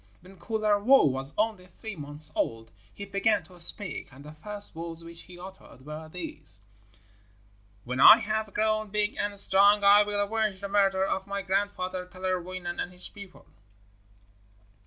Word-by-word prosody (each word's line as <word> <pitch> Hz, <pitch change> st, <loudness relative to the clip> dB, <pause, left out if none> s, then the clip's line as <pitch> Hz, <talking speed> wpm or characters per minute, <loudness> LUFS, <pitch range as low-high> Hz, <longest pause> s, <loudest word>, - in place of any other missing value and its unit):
When 185 Hz, +1 st, -17 dB
Kullervo 215 Hz, +5 st, +2 dB
was 135 Hz, +1 st, -4 dB
only 210 Hz, -4 st, -2 dB
three 220 Hz, +3 st, -10 dB
months 145 Hz, 0 st, +5 dB
old 115 Hz, 0 st, -3 dB, 0.2 s
he 200 Hz, -, -9 dB
began 200 Hz, +2 st, 0 dB
to 180 Hz, -1 st, -18 dB
speak, 170 Hz, -4 st, -2 dB
and 135 Hz, +2 st, -15 dB
the 150 Hz, -, -10 dB
first 205 Hz, +6 st, -2 dB
words 165 Hz, 0 st, +2 dB
which 170 Hz, 0 st, -9 dB
he 180 Hz, 0 st, -14 dB
uttered 180 Hz, -7 st, -13 dB
were 155 Hz, +1 st, -9 dB
these: 155 Hz, -, -10 dB, 1.3 s
'When 125 Hz, +1 st, -4 dB
I 215 Hz, +10 st, +10 dB
have 215 Hz, -2 st, -3 dB
grown 215 Hz, 0 st, -1 dB
big 210 Hz, +1 st, -1 dB
and 205 Hz, 0 st, -3 dB
strong 200 Hz, +1 st, +4 dB
I 200 Hz, +1 st, +7 dB
will 205 Hz, 0 st, -2 dB
avenge 210 Hz, -1 st, -1 dB
the 200 Hz, 0 st, -6 dB
murder 195 Hz, -1 st, +2 dB
of 190 Hz, 0 st, -3 dB
my 200 Hz, 0 st, -4 dB
grandfather 185 Hz, -1 st, -3 dB
Kalerwoinen 185 Hz, -1 st, -5 dB
and 180 Hz, -, -5 dB
his 180 Hz, 0 st, -7 dB
people.' 200 Hz, -2 st, -14 dB
190 Hz, 155 wpm, -27 LUFS, 170-205 Hz, 1.3 s, I